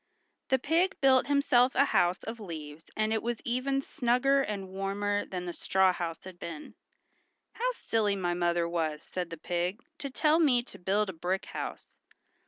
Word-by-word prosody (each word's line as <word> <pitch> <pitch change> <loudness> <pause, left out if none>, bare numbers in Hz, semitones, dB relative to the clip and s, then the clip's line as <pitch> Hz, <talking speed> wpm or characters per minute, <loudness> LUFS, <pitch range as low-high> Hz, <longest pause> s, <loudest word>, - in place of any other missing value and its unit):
The 265 - +4
pig 330 +8 +1
built 265 -1 +5
himself 280 -3 +4
a 280 - +5
house 175 -6 +2
of 225 +1 -6
leaves 160 -5 -8
and 215 0 +1
it 220 - 0
was 235 -1 -2
even 270 +3 0
snugger 255 +3 +2
and 205 -6 -3
warmer 200 +2 -1
than 180 -1 -4
the 175 - -4
straw 190 +1 +3
house 165 -2 -4
had 185 -2 -11
been. 160 -3 -7 0.8
"How - - 0
silly 215 - 0
my 175 -2 -1
mother 175 -1 +1
was," 160 -3 -2
said 180 -2 -4
the 165 - -7
pig, 175 +5 -2 0.2
"to 280 - -4
tell 305 +4 +3
me 255 -7 +4
to - - -12
build 195 +2 +1
a - - -15
brick 180 +4 -2
house. - - -7
205 Hz, 180 wpm, -30 LUFS, 175-255 Hz, 0.8 s, built